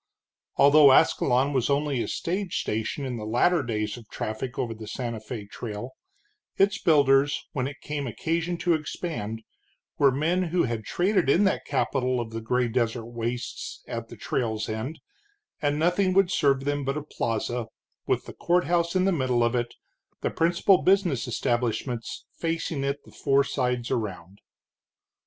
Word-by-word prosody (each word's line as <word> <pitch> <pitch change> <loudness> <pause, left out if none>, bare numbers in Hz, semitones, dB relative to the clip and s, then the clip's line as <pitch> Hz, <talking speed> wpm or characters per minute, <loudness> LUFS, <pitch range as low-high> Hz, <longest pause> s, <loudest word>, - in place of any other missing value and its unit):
Although 145 -1 +7
Ascalon 135 +2 +3
was 130 -1 +1
only 140 -2 +1
a - - -2
stage 185 +1 -2
station 110 +6 -2
in 125 -2 -3
the 110 - -6
latter 125 +10 +2
days 110 -3 -2
of 115 -3 -14
traffic 110 +4 -4
over 115 -2 -1
the 110 -1 -10
Santa 115 0 -4
Fé 110 -1 -7
Trail, 110 +3 -6 0.7
its 200 +1 +3
builders, 145 -2 +3
when 130 -2 -1
it 140 +1 -9
came 145 -2 -3
occasion 165 +8 -2
to 175 0 +2
expand, 150 - -4 0.6
were 140 -1 +6
men 165 +7 +1
who 175 +1 +1
had 115 -3 -3
traded 180 - +1
in 175 +8 +5
that 195 - +1
capital 130 -2 0
of 115 -1 -4
the 115 0 -4
gray 125 +2 +1
desert 115 -1 -1
wastes 120 +1 -5
at - - -5
the - - -10
trail's 110 -4 -2
end, 110 +8 -4 0.6
and 145 -1 +1
nothing 180 +4 +2
would 195 -1 +4
serve 140 -5 +2
them 145 0 0
but 135 +2 -1
a 150 - -4
plaza, 120 -3 -2 0.4
with - - 0
the - - -9
courthouse 175 0 +1
in 185 0 +3
the 195 - +3
middle 130 -7 +1
of 120 +1 +1
it, 120 -1 -2 0.5
the - - -1
principal 175 +3 +3
business 180 - +2
establishments 120 0 -2
facing 165 -3 -2
it 140 +1 0
the - - -15
four 140 0 +2
sides 125 -3 -1
around. 100 -3 -4
135 Hz, 165 wpm, -26 LUFS, 115-165 Hz, 0.7 s, Although